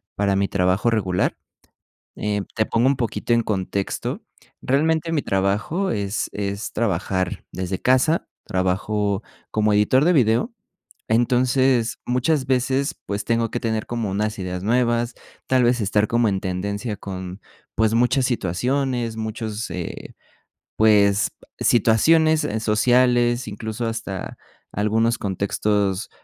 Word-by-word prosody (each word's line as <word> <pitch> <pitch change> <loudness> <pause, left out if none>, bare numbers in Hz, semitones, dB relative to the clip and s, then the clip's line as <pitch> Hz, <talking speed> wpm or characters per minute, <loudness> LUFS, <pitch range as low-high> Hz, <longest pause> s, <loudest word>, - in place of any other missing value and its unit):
para 100 -1 +1
mi 100 0 +1
trabajo 95 +4 +1
regular, 95 -5 0 0.8
eh, 105 -1 -1
te 110 -1 +1
pongo 115 +2 +1
un 135 0 +3
poquito 120 -1 -2
en 115 0 +4
contexto. 100 -2 -3 0.4
Realmente, 160 +4 +1
mi 150 - +1
trabajo 105 - 0
es 100 0 -2
es 100 0 -4
trabajar 95 -4 -1
desde 95 0 -3
casa, 130 +6 +2 0.2
trabajo 100 +2 -1 0.3
como 110 0 +1
editor 105 +7 +3
de 175 - +4
video. 125 - +2 0.6
Entonces, 125 +1 +2
muchas 130 +3 +1
veces, 135 +3 +1
pues 100 +1 -3
tengo 115 -1 0
que 120 - -3
tener 110 -1 -2
como 115 -4 -3
unas 105 +2 -2
ideas 90 -1 -4
nuevas, 120 +1 +1 0.3
tal 130 -1 +3
vez 120 0 +2
estar 105 +1 +1
como 115 -1 +2
en 95 -2 -1
tendencia 100 +4 -3
con 95 -1 -7 0.4
pues 110 0 +2
muchas 125 +3 +3
situaciones, 120 +2 -1
muchos, 110 0 -4
eh, 90 -2 -6 0.6
pues 105 -2 +4 0.3
situaciones 155 +8 +4 0.2
sociales, 120 +2 +3
incluso 110 +2 -4
hasta 115 -4 -5 0.3
algunos 110 +3 +1
contextos, 100 0 -1
110 Hz, 125 wpm, -22 LUFS, 100-125 Hz, 0.8 s, en